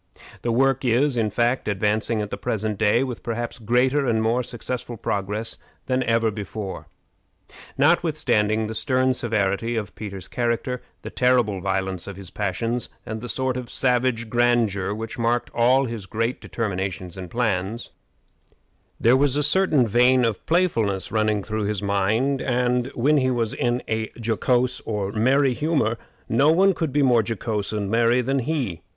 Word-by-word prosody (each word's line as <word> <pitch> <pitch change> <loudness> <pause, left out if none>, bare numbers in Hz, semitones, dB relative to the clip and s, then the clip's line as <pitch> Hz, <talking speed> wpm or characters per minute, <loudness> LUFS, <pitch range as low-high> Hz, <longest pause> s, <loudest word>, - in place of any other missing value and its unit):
The 120 - -1
work 135 +2 +2
is, 130 +3 +2
in 110 -3 +1
fact, 120 +4 0
advancing 105 +2 0
at 105 - -7
the - - -2
present 105 0 -2
day 110 +3 +3
with 125 -4 -5
perhaps 120 +1 -4
greater 125 +5 +2
and 115 -2 +2
more 115 +3 +1
successful 120 0 -5
progress 105 +3 -2 0.3
than 130 0 0
ever 115 -2 +2
before. 105 -1 -6 0.9
Notwithstanding 110 -9 +2
the 110 - -4
stern 130 +3 +1
severity 115 -1 -1
of 105 -4 -3
Peter's 100 -3 -7
character, 120 +1 -2 0.2
the - - -6
terrible 120 -6 +2
violence 95 -1 -2
of 100 - -6
his 95 -3 -10
passions, 115 +5 -2 0.2
and 110 0 -5
the 120 - -6
sort 130 0 -1
of 125 -2 -6
savage 125 -2 +1
grandeur 115 -5 +1
which 110 +3 -5
marked 120 +1 0
all 125 +3 +3
his 115 -5 -6
great 115 +4 -2
determinations 95 -5 -4
and 95 -2 -7
plans, 110 0 -2 1.1
there 120 +3 +5
was 140 0 +2
a 150 - +1
certain 155 -5 +3
vein 125 +3 +4
of 110 -4 -2
playfulness 115 - +1
running 110 -2 +1
through 110 0 -2
his 105 0 -2
mind; 110 +8 +1
and, 125 -1 +1
when 145 +5 +3
he 130 -2 +2
was 115 -3 -1
in 120 +1 -1
a 110 0 -2
jocose 120 +3 +1
or 105 -3 -2
merry 130 +5 +3
humor, 140 -6 0 0.3
no 140 +7 +4
one 190 +4 +4
could 160 -4 -2
be 145 +1 +2
more 125 -3 +4
jocose 110 -1 -3
and 105 -2 -2
merry 115 +2 +3
than 135 +2 0
he. 125 - -2
115 Hz, 160 wpm, -23 LUFS, 105-125 Hz, 1.1 s, there